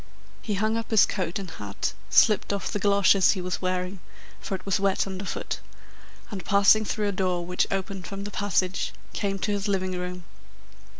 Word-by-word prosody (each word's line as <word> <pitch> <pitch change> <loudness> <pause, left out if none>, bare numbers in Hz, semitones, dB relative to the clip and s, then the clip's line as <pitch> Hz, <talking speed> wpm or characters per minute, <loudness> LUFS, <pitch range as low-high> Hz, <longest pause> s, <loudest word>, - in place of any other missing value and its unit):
He 210 - -2
hung 215 +3 +1
up 230 - -4
his 220 -3 +6
coat 185 -4 -2
and 195 -2 -5
hat, 100 -7 -4 0.2
slipped 210 -2 +4
off 200 -1 -2
the 210 - -1
galoshes 200 -1 +5
he 195 - -4
was 180 0 -3
wearing 185 +1 -2 0.4
(for 195 - -4
it 185 - -9
was 195 0 +1
wet 195 -1 +2
underfoot), 195 0 -4 0.7
and, 195 -4 -5
passing 200 +3 +5
through 210 -1 -1
a - - 0
door 185 -2 -1
which 180 +1 0
opened 195 -1 -3
from 195 -1 -6
the 205 - -6
passage, 195 -2 0 0.2
came 195 -1 -1
to 205 - -1
his 205 0 -1
living 190 -2 0
room. 180 0 -5
195 Hz, 185 wpm, -26 LUFS, 185-200 Hz, 0.7 s, his